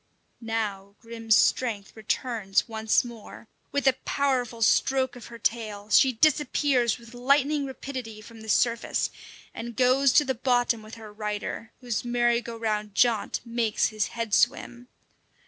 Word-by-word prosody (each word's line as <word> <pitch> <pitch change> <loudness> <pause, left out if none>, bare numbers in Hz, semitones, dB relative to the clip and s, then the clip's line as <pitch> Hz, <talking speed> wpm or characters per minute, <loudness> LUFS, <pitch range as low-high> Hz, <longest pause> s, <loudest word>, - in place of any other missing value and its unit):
Now 205 -3 -3
Grim's 230 -2 0
strength 215 -5 +1
returns 220 -2 -1
once 220 +1 +1
more. 230 -1 -11 0.2
With 285 0 -1
a 265 - +6
powerful 250 -5 0
stroke 260 +4 +2
of 245 - -10
her 235 - -10
tail, 215 -2 -3
she 265 - +6
disappears 275 -3 +2
with 235 -1 -15
lightning 280 +3 +1
rapidity 255 -5 -7
from 225 +1 -13
the 220 - -9
surface, 235 +2 +1 0.4
and 235 0 -7
goes 260 +2 +4
to 295 - +5
the 265 - 0
bottom 245 -2 +1
with 215 +1 -11
her 220 -2 -11
rider, 210 +1 -5
whose 240 -4 -2
merry 240 -1 +1
go 235 -1 -8
round 210 -2 -2
jaunt 230 -1 +2
makes 230 -2 0
his 215 -2 -1
head 230 -3 -5
swim. 245 +4 +1
235 Hz, 145 wpm, -26 LUFS, 220-250 Hz, 0.4 s, a